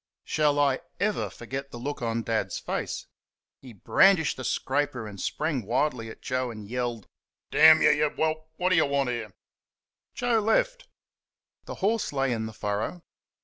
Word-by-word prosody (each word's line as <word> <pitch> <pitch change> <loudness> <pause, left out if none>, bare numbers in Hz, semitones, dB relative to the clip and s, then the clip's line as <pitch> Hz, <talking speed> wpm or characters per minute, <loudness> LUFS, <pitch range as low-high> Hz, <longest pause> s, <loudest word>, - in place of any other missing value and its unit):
Shall 150 -2 +1
I 140 -2 +3 0.2
ever 205 +1 0
forget 135 +4 -6
the 120 - -9
look 140 +3 -5
on 115 -1 -1
Dad's 110 -1 -1
face! - - -4 0.6
He 130 - -11
brandished 160 - +3
the 130 - -7
scraper 130 -1 -1
and 100 -3 -8
sprang 150 -6 -1
wildly 115 +1 -1
at - - -12
Joe 130 0 -1
and 110 -3 -8
yelled, 120 -2 -3 0.5
"Damn 160 0 +8
y', - - +7
you 150 0 +2
WHELP! 155 +1 -2
what 180 +1 +1
do 185 - +4
you 160 - +4
want 140 -2 0
here?" 115 -4 -4 0.8
Joe 245 -2 +2
left. - - +1 0.8
The - - -6
horse 225 +2 +1
lay 135 -2 0
in 110 -2 -2
the - - -7
furrow. 105 - -3
135 Hz, 165 wpm, -27 LUFS, 115-155 Hz, 0.8 s, Damn